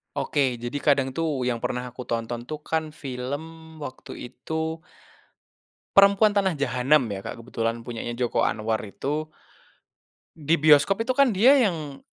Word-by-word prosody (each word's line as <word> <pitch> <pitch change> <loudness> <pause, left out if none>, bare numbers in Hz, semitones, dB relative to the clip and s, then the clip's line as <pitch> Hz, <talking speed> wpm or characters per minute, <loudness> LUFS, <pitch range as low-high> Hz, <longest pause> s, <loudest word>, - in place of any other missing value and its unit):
Oke, 130 -4 0
jadi 120 +3 -5
kadang 135 -3 +2
tuh 150 -6 -1
yang 120 -2 -2
pernah 125 0 -2
aku 125 +1 -8
tonton 115 0 -3
tuh 150 +4 -6
kan 160 0 -2
film 150 +4 -7
waktu 130 -3 -8
itu 160 +4 -4 1.2
Perempuan 200 +2 +7
Tanah 200 -3 +1
Jahanam 130 -1 +2
ya, 95 -1 -6
Kak, 115 - -6
kebetulan 115 -1 -3
punyanya 120 0 -5
Joko 120 0 0
Anwar 110 +1 0
itu, 145 +9 -3 1.1
di 160 +1 +1
bioskop 155 +8 +4
itu 255 - +1
kan 275 0 +4
dia 245 +8 +7
yang 155 - -1
145 Hz, 145 wpm, -25 LUFS, 120-160 Hz, 1.2 s, Perempuan